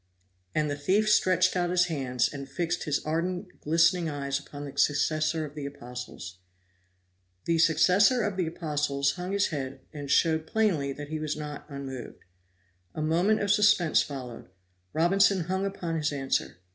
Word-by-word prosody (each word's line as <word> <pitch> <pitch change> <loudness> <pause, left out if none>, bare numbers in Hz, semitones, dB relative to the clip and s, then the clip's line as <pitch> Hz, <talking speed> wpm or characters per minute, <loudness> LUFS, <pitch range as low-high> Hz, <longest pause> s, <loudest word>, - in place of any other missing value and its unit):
And 155 -1 +1
the 145 - -2
thief 190 +9 +1
stretched 185 -3 +3
out 175 -1 +1
his 180 0 +3
hands, 130 -7 0
and 140 -2 -8
fixed 170 +1 -2
his 150 -2 -1
ardent, 175 +4 -3
glistening 165 +2 +3
eyes 140 -1 -2
upon 145 0 -9
the 140 -1 -9
successor 155 +2 +1
of 145 - -10
the 145 -2 -5
apostles. 125 -9 -8 1.1
The 165 -1 +1
successor 185 - +4
of 205 -2 -1
the 180 -3 -1
apostles 150 -4 -1
hung 180 +1 -5
his 200 0 +1
head 135 -3 -5
and 145 -2 -7
showed 160 +1 +2
plainly 175 -11 +1
that 145 +1 -7
he 155 0 -3
was 155 -1 -3
not 150 -1 -7
unmoved. 135 -3 -7 0.7
A - - -3
moment 175 +8 +2
of 205 -1 +1
suspense 210 -6 +4
followed 125 -8 -7 0.4
Robinson 195 +3 +3
hung 190 +3 -1
upon 175 -4 -4
his 150 -1 0
answer. 135 - -2
155 Hz, 160 wpm, -28 LUFS, 140-180 Hz, 1.1 s, successor